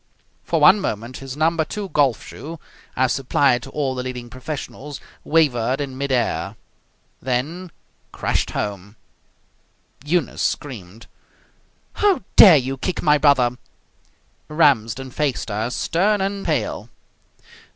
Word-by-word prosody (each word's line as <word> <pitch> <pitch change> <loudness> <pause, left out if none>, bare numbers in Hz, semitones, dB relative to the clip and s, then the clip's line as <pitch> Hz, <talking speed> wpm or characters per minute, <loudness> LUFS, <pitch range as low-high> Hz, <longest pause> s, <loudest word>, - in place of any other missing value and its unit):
For 165 - 0
one 170 +7 +7
moment 115 - -4
his 135 0 -8
number 160 +1 +2
II 200 -2 -4
golf 135 -6 +2
shoe, 160 +2 -9 0.4
as 130 -1 +2
supplied 130 -1 +2
to 135 - -10
all 135 -2 -2
the 130 - -4
leading 125 -2 -6
professionals, 145 +1 -7 0.2
wavered 135 -5 +2
in 140 -2 -4
mid 140 +1 -3
air, 110 -6 -1 0.7
then 150 +9 -3 0.4
crashed - - -1
home. 100 0 -5 1.1
Eunice 165 +3 -1
screamed. 115 -6 -4 0.9
"How 405 - +2
dare 180 -7 +10
you 135 0 -2
kick 180 +6 -3
my 150 -2 +4
brother!" 125 -5 +3 0.9
Ramsden 135 -5 +1
faced 140 -4 -2
her, 110 +3 -2
stern 195 +10 +1
and 195 +1 -2
pale. - - -2
135 Hz, 120 wpm, -21 LUFS, 125-160 Hz, 1.1 s, dare